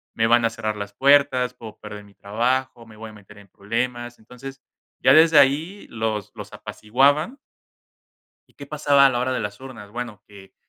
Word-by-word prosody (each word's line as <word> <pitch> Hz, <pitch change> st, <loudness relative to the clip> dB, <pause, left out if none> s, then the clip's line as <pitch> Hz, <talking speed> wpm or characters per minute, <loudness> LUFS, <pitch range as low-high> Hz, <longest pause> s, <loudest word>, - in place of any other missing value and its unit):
me 115 Hz, -, +1 dB
van 120 Hz, +1 st, +3 dB
a -, -, +2 dB
cerrar 110 Hz, -1 st, -4 dB
las 100 Hz, 0 st, -7 dB
puertas, 135 Hz, 0 st, +2 dB
puedo 115 Hz, -3 st, -12 dB
perder 105 Hz, -1 st, -10 dB
mi 100 Hz, -1 st, -21 dB
trabajo, 120 Hz, +3 st, -2 dB
me 110 Hz, -, -16 dB
voy 110 Hz, 0 st, -9 dB
a -, -, -16 dB
meter 105 Hz, 0 st, -17 dB
en 100 Hz, -, -18 dB
problemas". 120 Hz, +5 st, -5 dB
Entonces 125 Hz, +4 st, -12 dB, 0.4 s
ya 130 Hz, -, +5 dB
desde 160 Hz, 0 st, +5 dB
ahí 155 Hz, +9 st, +1 dB
los 110 Hz, -3 st, -4 dB
los -, -, -10 dB
apaciguaban 140 Hz, -, 0 dB, 1.1 s
¿Y -, -, -29 dB
qué 140 Hz, -, -11 dB
pasaba 145 Hz, -2 st, +3 dB
a -, -, +3 dB
la 120 Hz, -, -2 dB
hora 130 Hz, +1 st, -1 dB
de 125 Hz, -, -2 dB
las 105 Hz, 0 st, -6 dB
urnas? 120 Hz, -6 st, -11 dB
Bueno, 115 Hz, -3 st, -7 dB
que 100 Hz, -2 st, -16 dB
120 Hz, 190 wpm, -22 LUFS, 105-135 Hz, 1.1 s, ya